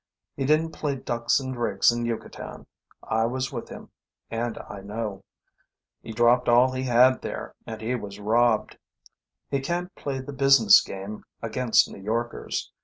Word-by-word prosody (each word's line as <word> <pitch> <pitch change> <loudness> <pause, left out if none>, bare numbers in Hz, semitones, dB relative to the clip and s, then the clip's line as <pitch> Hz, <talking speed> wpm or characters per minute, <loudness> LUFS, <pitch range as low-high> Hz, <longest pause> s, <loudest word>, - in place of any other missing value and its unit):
He 135 - -2
didn't 155 +3 +2
play 145 -3 -2
ducks 120 -2 0
and 130 -1 -4
drakes 120 -4 +2
in 120 0 -2
Yucatan. 115 -1 -6 0.4
I 110 +1 +1
was 130 +3 -3
with 115 - -6
him, - - -10 0.4
and 115 0 -2
I 100 - -8
know. 100 -1 -5 0.8
He 115 - -8
dropped 120 +2 +3
all 125 +2 +5
he 130 0 -3
had 130 0 +4
there, - - -6
and 110 -1 -6
he 115 +3 -1
was 105 -4 -5
robbed. 110 +1 +1 0.7
He 140 - +1
can't 175 +6 -3
play 135 -2 -4
the 135 +2 -7
business 135 -6 +6
game 100 +2 -7 0.2
against 115 +1 +3
New - - -11
Yorkers. 115 +4 -3
120 Hz, 160 wpm, -25 LUFS, 110-130 Hz, 0.8 s, business